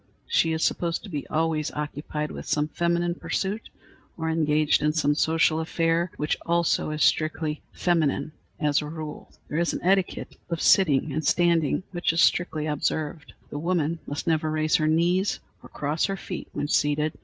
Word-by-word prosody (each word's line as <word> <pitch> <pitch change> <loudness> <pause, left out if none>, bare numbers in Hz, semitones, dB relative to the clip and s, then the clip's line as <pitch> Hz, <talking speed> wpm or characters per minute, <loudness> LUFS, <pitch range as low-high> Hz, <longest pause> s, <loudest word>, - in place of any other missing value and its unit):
She 165 - +2
is 160 0 -1
supposed 170 -1 0
to 210 - -9
be 150 -5 -4
always 160 -1 0
occupied 150 0 -4
with - - -8
some 150 0 0
feminine 170 +1 0
pursuit 195 +4 -3 0.5
or 160 -1 -1
engaged 155 -1 +2
in 150 0 +2
some 150 -2 +2
social 160 +1 +2
affair, 165 +1 0
which 150 - 0
also 170 -2 +1
is 155 0 0
strictly 155 -1 +1
feminine 155 -4 0 0.3
as 150 -3 +2
a 150 - -5
rule. 155 -1 -7 0.2
There 155 - -2
is 170 - +1
an - - -4
etiquette 190 0 0
of 170 -1 -2
sitting 155 -7 +4
and 155 +2 -1
standing, 170 0 +2
which 175 -2 0
is 165 - +3
strictly 160 -4 +2
observed. 150 0 -2 0.2
The 145 - -4
woman 165 -1 0
must 145 - -4
never 160 -1 +1
raise 155 0 +2
her 155 - +1
knees 175 +5 +2 0.2
or - - -13
cross 150 +3 -1
her 195 -1 -2
feet 185 -2 -6
when 145 - -3
seated. 150 +1 +1
160 Hz, 175 wpm, -26 LUFS, 150-170 Hz, 0.5 s, sitting